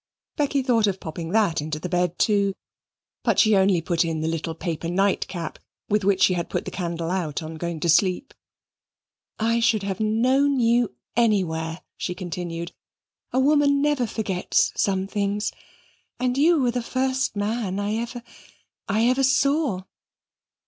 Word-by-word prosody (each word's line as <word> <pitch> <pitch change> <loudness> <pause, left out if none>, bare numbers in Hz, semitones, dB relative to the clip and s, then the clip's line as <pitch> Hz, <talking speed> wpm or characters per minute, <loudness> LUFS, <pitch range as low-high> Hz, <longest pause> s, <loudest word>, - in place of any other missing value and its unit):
Becky 280 -2 0
thought 230 -4 +3
of 195 -1 -1
popping 160 +1 -6
that 200 -6 +2
into 155 0 -4
the 155 - -5
bed 180 -1 0
too, 200 -2 +2 0.7
but - - +1
she 215 -2 +5
only 190 -3 +3
put 170 0 +1
in 165 -2 -2
the 160 - -1
little 165 0 -3
paper 165 -1 -4
night 195 +2 +1
cap 170 -4 -6 0.3
with 210 0 +2
which 195 -1 +3
she 185 - +5
had 170 -2 -3
put - - -2
the - - -5
candle 170 -2 -3
out 170 -5 -2
on 160 +1 -6
going 170 0 -4
to - - 0
sleep. 185 - +2 1.0
"I 230 +1 +1
should 220 -3 +2
have 195 -1 -3
known 255 +6 +2
you 235 - +2 0.2
anywhere," 175 -8 +1 0.2
she 180 - -3
continued; 175 -2 -5 0.6
"a 255 - +1
woman 285 0 +4
never 290 -4 +1
forgets 195 -5 0
some 190 -1 +1
things. 200 +1 -1 0.7
And 250 0 0
you 315 +4 +4
were 250 -3 +2
the 245 0 -2
first 260 0 -1
man 205 -1 -2
I 205 +2 -1
ever 235 +1 -5 0.6
I 215 +3 +2
ever 255 +2 +3
saw." 270 - +2
200 Hz, 160 wpm, -24 LUFS, 175-240 Hz, 1.0 s, she